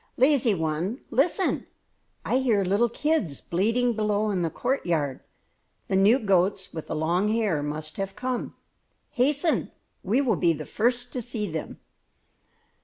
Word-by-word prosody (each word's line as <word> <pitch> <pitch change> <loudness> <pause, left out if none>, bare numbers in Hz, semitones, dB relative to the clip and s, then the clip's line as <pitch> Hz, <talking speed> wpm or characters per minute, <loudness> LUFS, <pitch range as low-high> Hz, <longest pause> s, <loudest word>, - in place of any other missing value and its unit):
"Lazy 260 -5 +4
one, 165 - -2
listen! 350 +7 +1 0.6
I 255 - +2
hear 230 -7 +2
little 200 +6 +2
kids 235 - -1
bleating 230 +7 +1
below 210 -1 0
in 185 -3 0
the 165 - 0
courtyard; 165 - -1 0.7
the 195 - +1
new 200 +6 +5
goats 195 -4 +1
with 160 - -6
the - - -3
long 170 +6 +1
hair 210 -8 +1
must 155 +1 -5
have 195 0 -4
come. 255 -1 -3 0.6
Hasten! 285 +6 +1 0.3
We 215 +8 +1
will 240 -9 +2
be 170 -2 +3
the 155 -1 -6
first 245 +2 0
to 250 - -2
see 225 -2 -3
them!" 160 -1 -6
210 Hz, 145 wpm, -26 LUFS, 175-245 Hz, 0.7 s, new